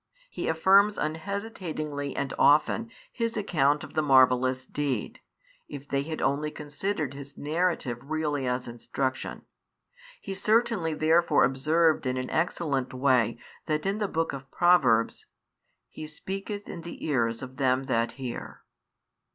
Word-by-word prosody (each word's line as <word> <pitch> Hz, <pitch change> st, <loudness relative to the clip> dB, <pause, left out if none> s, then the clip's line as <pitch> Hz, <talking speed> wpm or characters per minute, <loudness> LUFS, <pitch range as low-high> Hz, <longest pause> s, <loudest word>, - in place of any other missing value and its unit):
He -, -, -4 dB
affirms 195 Hz, +6 st, +4 dB
unhesitatingly 160 Hz, -4 st, -4 dB
and 140 Hz, -, -2 dB
often 155 Hz, +10 st, +4 dB, 0.2 s
his 230 Hz, -1 st, -2 dB
account 150 Hz, -8 st, +2 dB
of 155 Hz, -, -10 dB
the 155 Hz, -, +2 dB
marvellous 130 Hz, -2 st, +4 dB
deed, 145 Hz, -, -3 dB, 0.5 s
if 145 Hz, 0 st, -9 dB
they 140 Hz, -1 st, 0 dB
had 155 Hz, +2 st, -4 dB
only 145 Hz, +2 st, +1 dB
considered 150 Hz, 0 st, -3 dB
his 140 Hz, 0 st, -10 dB
narrative 155 Hz, -6 st, -1 dB
really 150 Hz, -4 st, -1 dB
as 125 Hz, 0 st, -1 dB
instruction. 130 Hz, +2 st, -4 dB, 0.8 s
He 195 Hz, -, -6 dB
certainly 205 Hz, -4 st, +1 dB
therefore 165 Hz, +3 st, +4 dB
observed 155 Hz, +4 st, +2 dB
in 130 Hz, 0 st, -1 dB
an 130 Hz, 0 st, -4 dB
excellent 150 Hz, -6 st, -1 dB
way 125 Hz, -4 st, +2 dB, 0.3 s
that 155 Hz, +1 st, -1 dB
in 195 Hz, +2 st, 0 dB
the 210 Hz, -, 0 dB
Book 165 Hz, -4 st, -1 dB
of 135 Hz, -1 st, -8 dB
Proverbs: 135 Hz, -12 st, +3 dB, 0.6 s
He 155 Hz, -, -8 dB
speaketh 195 Hz, +6 st, -6 dB
in 170 Hz, -, -7 dB
the 170 Hz, +1 st, -8 dB
ears 115 Hz, -5 st, 0 dB
of 130 Hz, 0 st, -9 dB
them 130 Hz, -1 st, +2 dB
that 115 Hz, -3 st, 0 dB
hear. 130 Hz, -3 st, -7 dB
150 Hz, 135 wpm, -27 LUFS, 130-170 Hz, 0.8 s, affirms